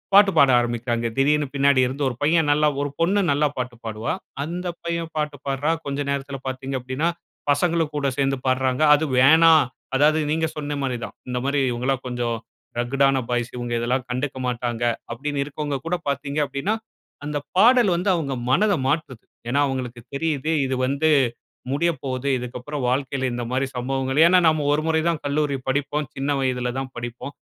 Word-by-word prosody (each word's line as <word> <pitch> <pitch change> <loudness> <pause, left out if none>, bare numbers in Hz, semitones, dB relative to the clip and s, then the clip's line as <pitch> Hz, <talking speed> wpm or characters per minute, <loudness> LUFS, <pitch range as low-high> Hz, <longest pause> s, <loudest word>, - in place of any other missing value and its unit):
பாட்டு 200 -1 +7
பாட 140 -1 +7
ஆரம்பிக்குறாங்க. 120 0 -1
திடீர்னு 145 +2 +3
பின்னாடி 140 -1 +4
இருந்து 135 +3 -3
ஒரு 120 - -6
பையன் 155 0 +3
நல்லா 150 +1 +3
ஒரு 145 - -1
பொண்ணு 190 +5 +2
நல்லா 145 +1 +3
பாட்டு 125 -1 -3
பாடுவா. 110 0 -3 0.3
அந்த 175 +4 -5 0.2
பையன் 170 -1 -3
பாட்டு 150 -1 -2
பாடுறான். 145 +4 0
கொஞ்ச 140 0 -2
நேரத்துல 140 0 -3
பார்த்தீங்க 130 +1 -4
அப்படீனா, 130 +6 -2 0.4
பசங்களும் 165 +1 +1
கூட 140 -1 0
சேர்ந்து 135 -1 +1
பாடுறாங்க. 130 +1 +1
அது 160 +2 -1
வேணா 160 +5 +7 0.4
அதாவது 155 +3 +4
நீங்க 160 0 +1
சொன்ன 145 -1 -3
மாரி 130 -3 -1
தான். - - -11
இந்த 125 0 -3
மாரி, 140 0 +1
"இவங்கலாம் 130 +2 -1
கொஞ்சம் 120 -1 -2 0.4
ரக்கடான 135 +2 +2
பாய்ஸ், 120 -1 -1
இவங்க 120 -1 -4
இதெல்லாம் 125 +2 -1
கண்டுக்க 130 +2 -3
மாட்டாங்க." 120 -1 -2 0.3
அப்படின்னு 140 +4 -3
இருக்கவங்க 145 0 -3
கூட 175 +2 0
பார்த்தீங்க 140 +1 -2
அப்படினா, 185 +11 -1 0.5
அந்த 150 0 -2 0.2
பாடல் 240 -1 +6
வந்து 180 +3 0
அவங்க 140 -6 -2 0.2
மனத 205 +8 +3
மாற்றுது. 135 -5 -2 0.3
ஏன்னா 140 +3 +2
அவங்களுக்கு 125 -2 -4
தெரியுது 155 0 -1
இது 130 0 -1
வந்து 140 +4 +1 0.6
முடியப்போது. 140 -5 -1
இதுக்கப்புறம் 125 +3 -5
வாழ்க்கைல 130 0 -1
இந்த 120 -1 -3
மாரி 130 +1 +1
சம்பவங்கள் 135 +3 0
ஏன்னா 180 +1 +5
நம்ம 155 -2 0
ஒரு 155 +1 0
முறை 160 0 +2
தான் 165 - -1
கல்லூரி 145 -1 0
படிப்போம். 145 +1 -1
சின்ன 140 +2 -1
வயதுல 125 -2 -1
தான் 130 -1 -6
படிப்போம். 120 +4 -6
140 Hz, 165 wpm, -23 LUFS, 130-150 Hz, 0.6 s, பாட்டு